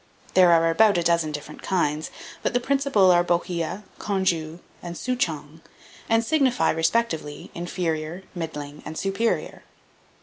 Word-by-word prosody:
There 180 -2 +6
are 165 0 +4
about 210 +2 +4
a 170 - +1
dozen 170 -2 +2
different 150 0 -7
kinds; 155 -5 0 0.3
but - - -1
the - - +4
principal 270 -8 +3
are 175 0 +5
Bohea, 175 +2 -1 0.2
Congou, 175 -5 -1 0.2
and 175 -1 -6
Souchong, 160 - -2 0.5
and 225 0 +3
signify, 270 -3 +2
respectively, 160 -3 -1
inferior, 170 0 -3
middling, 150 -4 -6
and 160 - -7
superior. 195 +4 -1
175 Hz, 130 wpm, -24 LUFS, 160-205 Hz, 0.5 s, There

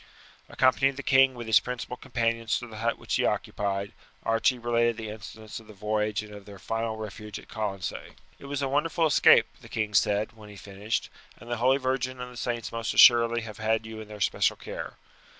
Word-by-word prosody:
Accompanying 135 +1 +3
the - - -6
king 135 -1 +5
with 120 -1 -7
his 110 -1 +6
principal 125 0 -5
companions 115 -2 -1
to 120 - -6
the 110 -2 -10
hut 115 +1 0
which - - -2
he - - +1
occupied, 100 -1 -1 0.3
Archie 115 +3 +2
related 120 -1 +1
the 110 -1 -5
incidents 110 0 -9
of 110 - -17
the 110 - -13
voyage 105 +1 -1
and 105 0 -11
of 100 -1 -11
their 100 -1 -11
final 115 +3 -3
refuge 105 -1 -7
at - - -12
Colonsay. 100 -5 -4 0.3
"It - - -12
was 140 0 -3
a - - +1
wonderful 160 +4 +1
escape," 155 - +6 0.2
the - - -13
king 110 -2 -2
said 105 +1 +2
when 110 -2 -14
he 105 - -11
finished, 100 +2 -4 0.3
"and 120 +2 -11
the 120 - 0
holy 130 +4 +3
Virgin 130 -1 -2
and 125 0 -7
the - - -12
saints 120 -1 -3
must 115 0 -3
assuredly 120 -1 +7
have 110 -2 -8
had 110 +1 0
you 110 0 -7
in 110 - -10
their 105 0 -9
especial 100 - +1
care. - - -7
115 Hz, 210 wpm, -27 LUFS, 105-125 Hz, 0.3 s, assuredly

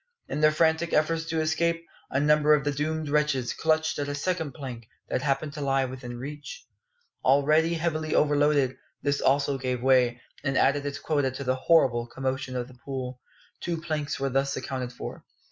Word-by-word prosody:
In 150 - -3
their 155 - +7
frantic 160 +1 +2
efforts 160 +1 +2
to 165 -1 -1
escape, 170 +1 0 0.2
a 130 - 0
number 150 +1 +5
of 145 - -1
the 145 - 0
doomed 155 +2 -2
wretches 145 -4 +1
clutched 160 -1 +1
at 145 - -1
a 145 - -2
second 160 -1 -2
plank 125 -6 -8 0.2
that - - 0
happened 140 +1 -1
to 150 - -6
lie 135 -1 +2
within 125 -2 -7
reach. 150 - -8 0.6
Already 150 +5 +4
heavily 155 -1 -1
overloaded, 145 -3 +3 0.3
this 140 0 +1
also 140 0 +2
gave 125 -1 -2
way, 125 -2 +4 0.2
and 135 -2 0
added 145 +1 +2
its 140 0 -3
quota 145 -4 0
to 130 +2 -6
the 130 -1 +1
horrible 130 -4 +3
commotion 130 +1 -3
of 125 -1 -2
the 130 - -14
pool. 130 -2 -5 0.4
Two 170 -2 -3
planks 155 -3 -3
were 135 0 0
thus 135 +1 0
accounted 130 -1 -4
for. 125 - -8
145 Hz, 180 wpm, -27 LUFS, 130-155 Hz, 0.6 s, their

